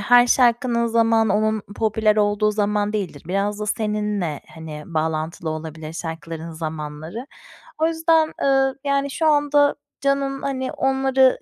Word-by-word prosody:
her 245 +3 +6
şarkının 240 -1 +3
zamanı 225 -2 +3
onun 215 -1 0
popüler 215 -1 +2
olduğu 210 0 +2
zaman 210 0 0
değildir. 190 -9 -4
Biraz 200 +3 -1
da 210 - -3
seninle, 210 -7 -1
hani, 155 -2 -8
bağlantılı 160 0 -2
olabilir 155 0 -6
şarkıların 165 0 -6
zamanları. 160 - -6 0.5
O 315 - +3
yüzden, 325 -1 +2
ııı, 270 -1 +2
yani, 280 0 0
şu 320 +4 -1
anda 290 -1 +4 0.3
canın, 275 0 0
hani, 260 -2 -2
onları 265 -1 +3
215 Hz, 130 wpm, -22 LUFS, 165-265 Hz, 0.5 s, her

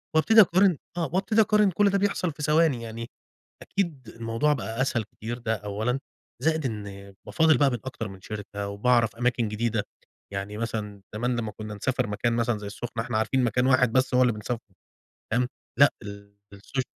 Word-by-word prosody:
وأبتدي 220 +8 +7
أقارِن 185 -2 +4 0.2
آه 165 -2 0
وأبتدي 205 +4 +3
أقارِن، 210 -1 +4
كلّ 200 +4 +3
ده 200 - +2
بيحصَل 200 -3 0
في 150 0 -8
ثواني 150 -5 +3
يعني، 115 +1 -6 0.5
أكيد 155 - -3
الموضوع 115 +6 +1
بقى 115 -3 -3
أسهل 125 -3 +1
كتير 110 +3 -7
ده 115 -2 -1
أولًا، 110 +5 -2 0.4
زائد 160 +1 +1
إن 100 -4 -6
بافاضّل 160 -1 +4
بقى 145 -2 +4
من 120 - -1
أكتر 120 -3 -4
من 95 -2 -11
شركة 100 0 -6
وبأعرف 115 +2 +2
أماكن 120 -1 +1
جديدة 110 0 -1 0.5
يعني 100 +2 -4
مثلًا 105 -3 -4
زمان 120 +3 0
لمّا 110 -2 -3
كنّا 105 +1 -7
نسافر 105 +3 -1
مكان 110 +3 0
مثلًا 115 -1 +1
زي 105 -1 -7
السُّخنة، 115 +3 -5
إحنا 120 -2 -2
عارفين 125 +4 +1
مكان 125 +1 +2
واحد 130 -3 +4
بس 130 +1 +2
هو 125 - +5
اللي 125 -2 +4
بنسافره، 105 -1 -6 0.6
فاهم، 125 +2 +2 0.3
لأ 140 +1 +7 0.6
الSocial 125 +7 -3
120 Hz, 175 wpm, -26 LUFS, 110-145 Hz, 0.6 s, وأبتدي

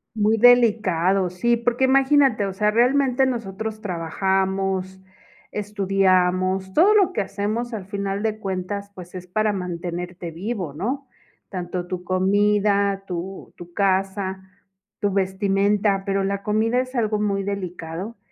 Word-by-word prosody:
Muy 215 +1 +2
delicado, 205 -6 +4
sí, 235 +7 +1
porque 245 +2 +1
imagínate, 270 -4 +4
o 195 - -3
sea, 210 +2 +1
realmente 260 +3 +3
nosotros 220 -2 -4
trabajamos, 190 +1 -1 0.5
estudiamos, 190 -2 +1
todo 410 +6 +5
lo 395 -3 +4
que 210 - 0
hacemos 210 +5 -3
al 200 -4 -5
final 200 0 -3
de 215 -1 -1
cuentas, 200 +1 -4
pues, 180 -1 -11
es 180 0 -8
para 215 +3 0
mantenerte 175 -1 -5
vivo, 180 -3 -4
¿no?, 260 - -3 0.4
tanto 180 -1 -4
tu 180 -1 -5
comida, 200 +1 +2
tu 185 +2 -6
tu 175 0 -12
casa, 190 0 0 0.6
tu 205 -1 0
vestimenta, 195 +1 +1
pero 195 -1 0
la 200 0 -2
comida 220 +4 +1
es 255 0 -8
algo 215 -3 0
muy 200 -1 0
delicado, 185 +1 -5
195 Hz, 130 wpm, -23 LUFS, 185-215 Hz, 0.6 s, todo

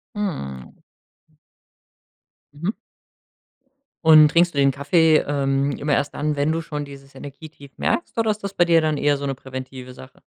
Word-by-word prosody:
Mhm, 70 - -5
o - - -31 1.7
Mhm. 170 +8 -2 1.3
Und 155 -1 +8
trinkst 170 +1 +3
du 140 - -5
den 140 -1 +4
Kaffee, 155 +3 +3
ähm, 140 -1 0
immer 145 +1 -1
erst 140 0 0
dann, 150 0 -1
wenn 145 +1 0
du 165 +1 -1
schon 150 -2 -5
dieses 140 -1 -13
Energietief 145 0 -12
merkst 345 - -2
oder 225 -1 +2
ist 210 - -9
das 200 -1 -4
bei 175 - +3
dir 170 -1 +4
dann 155 -1 0
eher 145 0 +2
so 140 - -6
'ne 135 -1 -3
präventive 130 -1 -9
Sache? 130 +1 -15
145 Hz, 170 wpm, -22 LUFS, 135-160 Hz, 1.7 s, Und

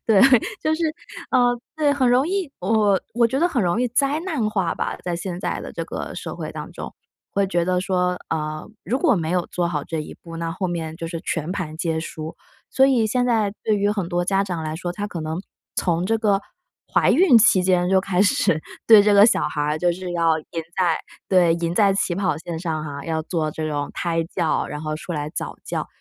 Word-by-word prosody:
对， 215 -4 +5 0.4
就 310 0 +1
是 335 - -3 0.5
呃， 245 -1 +3 0.2
对， 300 -2 +3
很 265 -3 +2
容 255 +3 +4
易 380 -5 -1
我 205 0 +2
我 235 0 +3
觉 245 +4 +1
得 340 - +4
很 265 -10 0
容 180 +5 +1
易 250 - +2
灾 275 +5 +1
难 250 - 0
化 190 -6 0
吧， - - -3
在 175 - -1
现 175 +1 -4
在 - - -3
的 - - -8
这 - - -4
个 - - -5
社 - - -5
会 - - -5
当 - - -7
中， - - -7 0.4
会 200 0 +1
觉 175 -3 0
得 180 0 +1
说， 180 -1 0
呃， 155 0 -3
如 255 - -1
果 310 -4 +3
没 165 -4 -2
有 180 -1 0
做 175 -1 -1
好 150 -4 -2
这 160 -1 -3
一 - - -9
步， 165 -1 -9
那 165 0 -3
后 185 +3 -2
面 165 -2 -4
就 165 - -5
是 165 0 -5
全 165 -1 -3
盘 165 -6 -4
皆 160 -1 -1
输。 160 0 -7 0.3
所 265 - +4
以 255 -5 +3
现 245 +3 +1
在 220 -5 +1
对 215 - +2
于 205 0 +1
很 200 -4 -1
多 175 0 0
家 195 +1 +2
长 180 -5 -4
来 155 0 -3
说， 175 +2 -4
他 205 +4 -4
可 175 -5 -6
能 160 +2 -3 0.4
从 175 -1 +1
这 225 +4 +1
个 205 -3 +2 0.5
怀 - - +4
孕 345 -9 +6
期 190 -3 +5
间 180 -1 +2
就 190 0 +4
开 190 -1 0
始 210 - +2 0.3
对 220 -2 +9
这 210 0 +3
个 200 0 +8
小 - - +2
孩 150 0 -1
就 175 +2 +2
是 180 0 -6
要 165 -2 +2
赢 155 - -11 0.3
在 175 -4 +2 0.3
对， 175 -3 +4
赢 170 0 -2
在 200 0 +4
起 195 -2 0
跑 185 -6 0
线 165 0 -5
上 160 -3 -3
哈， 140 -2 -6
要 160 0 -1
做 160 -1 -2
这 155 +1 -3
种 145 -1 -2
胎 165 -1 0
教， 165 -1 -1
然 150 - -6
后 155 0 -3
出 175 - -6
来 150 -2 -3
早 - - -5
教。 - - -3
180 Hz, 245 characters per minute, -22 LUFS, 165-215 Hz, 0.5 s, 对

